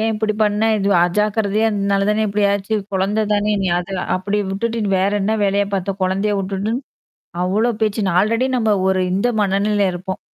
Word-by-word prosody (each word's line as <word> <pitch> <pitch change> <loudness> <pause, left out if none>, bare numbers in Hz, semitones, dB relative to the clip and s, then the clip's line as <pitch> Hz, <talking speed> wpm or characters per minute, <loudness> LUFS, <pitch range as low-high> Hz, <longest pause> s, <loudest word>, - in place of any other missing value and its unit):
ஏன் 225 +1 +1
இப்படி 215 0 -1
பண்ண? 210 +1 0 0.2
இது 195 - 0 0.2
அஜாக்கிரதையா 210 +3 +1
அதனால 200 -1 0
தான 215 +1 +1
இப்படி 205 +1 0
ஆச்சு 200 +2 -2 0.2
குழந்த 200 +3 0
தானே 210 +1 +1
நீ - - 0
அத 180 - -6 0.3
அப்படிவுட்டுட்டு 205 +4 -2 0.2
வேற 195 +2 +2
என்ன 215 +3 +1
வேலையா 200 +1 +1
பாத்த? 195 0 -2
கொழந்தையவுட்டுட்டுன்னு, 195 +2 -1 0.7
அவ்ளோ 210 +6 +1
பேச்சு 215 -1 0
நா 180 - 0
ஆல்ரெடி 230 +5 +1
நம்ம 220 -3 +1 0.2
ஒரு 190 0 +1
இந்த 200 +6 +1
மனநிலை 200 +1 +1
இருப்போம். 185 +2 -5
205 Hz, 165 wpm, -19 LUFS, 195-215 Hz, 0.7 s, வேற